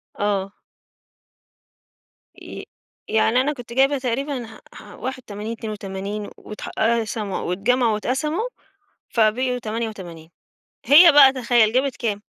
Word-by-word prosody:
آه. 200 -1 -1 1.9
ي - - -9 0.4
يعني 220 +3 +2
أنا 295 +3 -1
كنت 245 -3 -10
جايبة 270 +2 +3
تقريبًا 260 0 -3
ح 220 -1 -13
ح - - -12
81 225 -4 -6
82 205 -2 -6
واتح 210 - -9
قسموا، 220 -3 -1
أو 180 - -3
اتجمعوا 235 +4 +1
واتقسموا 270 - -2 0.7
فبقيوا 250 +3 +1
88 210 -8 -6 0.6
هي 330 +4 +8
بقى 275 -2 +7
تخيّل 235 -3 +2
جابت 265 +1 +1
كام؟ 210 -4 -3
230 Hz, 110 wpm, -22 LUFS, 210-260 Hz, 1.9 s, هي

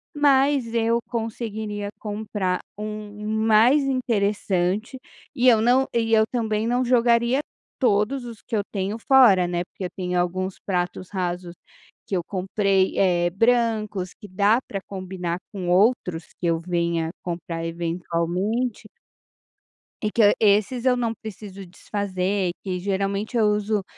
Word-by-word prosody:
mas 275 -4 +3
eu 230 0 +2
conseguiria 220 -3 -4
comprar 205 -3 -2 0.2
um 210 0 -6
mais 220 +6 +4
interessante 210 -4 0 0.4
e 255 +1 +2
eu 225 -3 +6
não 255 +3 +3
e 225 -1 +1
eu 220 - +6
também 220 -2 -1
não 245 +2 +1
jogaria 240 +2 +3 0.4
todos 240 +2 +1
os 230 -3 -9
que 230 - -4
eu 205 - +2
tenho 200 +1 -2
fora 225 -8 +5
né, 175 0 -1
porque 185 +1 -8
eu 180 - -3
tenho 180 -1 -1
alguns 185 +2 -2
pratos 180 -1 -2
rasos 180 -2 -3 0.5
que 195 - -2
eu 175 - -2
comprei, 195 0 0
eh, 175 -2 +3
brancos 215 -2 +1
que 205 - -12
dá 205 +5 +3
para 195 - -4
combinar 185 -3 -5 0.2
com 185 -3 -4
outros 180 -3 +2
que 175 - -1
eu 165 -1 +1
venha 170 -1 -1
comprar 170 -1 -4
eventualmente 175 +7 -2 1.1
e 215 - 0
que 225 - +3
hã 205 - +7
esses 215 +4 +2
eu 255 -1 +4
não 230 -2 -1
preciso 200 -2 -9
desfazer, 190 0 -2
que 185 -2 -3
geralmente 200 +4 -2
eu 225 -2 +4
uso 210 -1 0
205 Hz, 140 wpm, -24 LUFS, 185-230 Hz, 1.1 s, hã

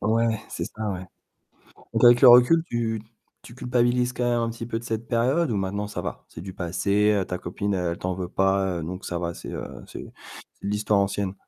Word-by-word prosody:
Ouais, 115 0 +1
c'est - - -4
ça, 110 -1 -5
ouais. 95 -1 -5 0.9
Donc - - +2
avec 120 0 +7
le 130 - +9
recul, 125 +7 +7
tu 115 -2 -2 0.4
tu 120 - -13
culpabilises 125 0 +1
quand 125 -1 -2
même 120 -1 +1
un 115 0 -1
petit 115 0 -7
peu 115 -1 -2
de 120 - -13
cette 115 0 -3
période 130 +5 +1
ou - - 0
maintenant 100 +2 -2
ça 105 - -5
va? - - -6
C'est - - -10
du 95 +2 -7
passé, 100 +4 +1
heu, 100 -2 +1
ta 90 0 -4
copine, 100 +3 -3
heu, 90 -2 -1
elle - - -7
t'en 95 - -2
veut 90 -1 -4
pas 95 -2 +1
donc 90 +4 -6
ça 85 - -3
va, 85 -1 -3
c'est - - -9
heu, - - -4 0.2
c'est - - -8 0.5
c'est - - -10
de - - -1
l'histoire 105 0 +1
ancienne? 100 -1 -1
105 Hz, 230 wpm, -25 LUFS, 95-120 Hz, 0.9 s, le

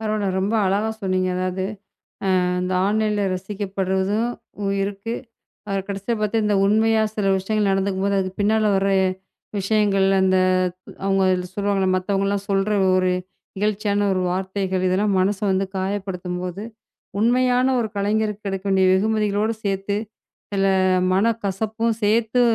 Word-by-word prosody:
பரவால்ல 215 -2 -1
ரொம்ப 200 +4 0
அழகா 205 +4 +1
சொன்னீங்க. 185 -1 0
அதாவது 185 +1 -2 0.8
அ - - +1 0.2
இந்த 185 +1 -2
ஆன்லைன்ல 210 0 +1
ரசிக்கப்படுறதும் 195 +2 -1 0.5
இருக்கு 200 +3 -4 0.6
ஆ - - -1 0.2
கடைசியா 200 +4 -2
பாத்த 210 -1 +1
உண்மையா 220 +2 +3
சில 210 -2 -1
விஷயங்கள் 205 +1 0
நடந்துக்கும்போது, 195 0 0
அதுக்கு 185 0 -5
பின்னால 215 +1 +2
வர்ற 195 +1 +1 0.7
விஷயங்கள். 195 -1 +2
அந்த 190 0 +3 0.7
அவங்க 195 -1 +2 0.3
சொல்வாங்கல, 200 -2 0
மத்தவங்கள்லாம் 195 +1 -1
சொல்ற 195 +1 +1 0.3
ஒரு 185 0 +2 0.5
இகழ்ச்சியான 205 0 0
ஒரு 185 - 0
வார்த்தைகள் 190 0 -2
இதெல்லாம் 195 +2 +1
மனச 195 +1 +1
வந்து 190 +1 +1
காயப்படுத்தும்போது, 185 -1 -3 0.6
உண்மையான 250 +2 +3
ஒரு 225 - 0
கலைஞருக்கு 210 0 -1
கிடைக்க 195 0 -4
வேண்டிய 190 -1 +4
வெகுமதிகளோட 210 +1 +1
சேர்த்து, 195 +1 -1 0.6
சில 195 -1 +1 0.5
மனக் 225 +4 +1
கசப்பும் 220 +3 -1
சேர்த்து 225 +3 +2
200 Hz, 120 wpm, -22 LUFS, 190-215 Hz, 0.8 s, வேண்டிய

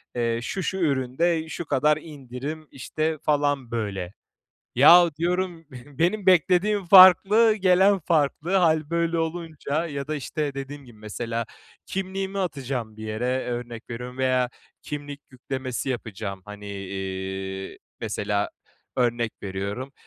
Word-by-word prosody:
eee, 115 -1 0
şu 185 +10 -3
şu 190 - -2
üründe 160 +2 0
şu 170 - -5
kadar 150 +1 +2
indirim, 145 +1 -7
işte, 155 +4 -2
falan 145 -4 +1
böyle. 100 -5 -3 0.6
Yahu 170 +7 +8
diyorum 175 -1 -1 0.3
benim 185 +4 +1
beklediğim 185 +3 +3
farklı, 195 +5 +8
gelen 195 0 +4
farklı. 165 +2 +1
Hâl 160 -4 +2
böyle 170 0 0
olunca 160 -1 -2
ya 140 -3 -5
da, 155 - -1
işte, 145 0 -3
dediğim 140 +1 -7
gibi 120 -4 -16
mesela 115 +2 -4 0.4
kimliğimi 195 +1 -3
atacağım 130 - -3
bir 110 - -8
yere 125 +4 -1
örnek 120 -1 -6
veriyorum 125 +2 -7
veya 130 -1 +1 0.3
kimlik 145 -1 -6
yüklemesi 130 0 -4
yapacağım, 105 -6 -5
hani, 105 0 -10
iii, 95 -1 -5 0.2
mesela 105 0 -1 0.5
örnek 120 -3 +1
veriyorum, 100 +7 -4
140 Hz, 125 wpm, -25 LUFS, 115-170 Hz, 0.6 s, Yahu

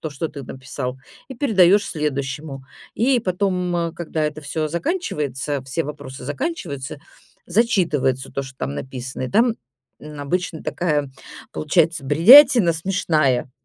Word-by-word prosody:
то, 155 - -4
что 150 +2 -4
ты 140 - -9
написал 130 0 -6 0.3
и 265 - -7
передаешь 205 -6 +4
следующему. 140 -2 -4 0.3
И 250 +3 +2
потом, 180 -4 -1
когда 160 -2 -3
это 150 0 -3
всё 155 +1 -3
заканчивается, 150 - -2
все 135 +5 -2
вопросы 140 -3 -8
заканчиваются, 145 - -4 0.5
зачитывается 170 - +1
то, 140 - -2
что 135 -1 -11
там 70 - -4
написано. 130 - -6
И 130 - -2
там, 230 +2 +3 0.4
м, 150 -1 -9
обычно 165 +3 -2
такая 150 -5 -1 0.4
получается 160 -1 +1
бредятина 210 - +7
смешная. 155 -7 0
155 Hz, 125 wpm, -21 LUFS, 135-185 Hz, 0.5 s, бредятина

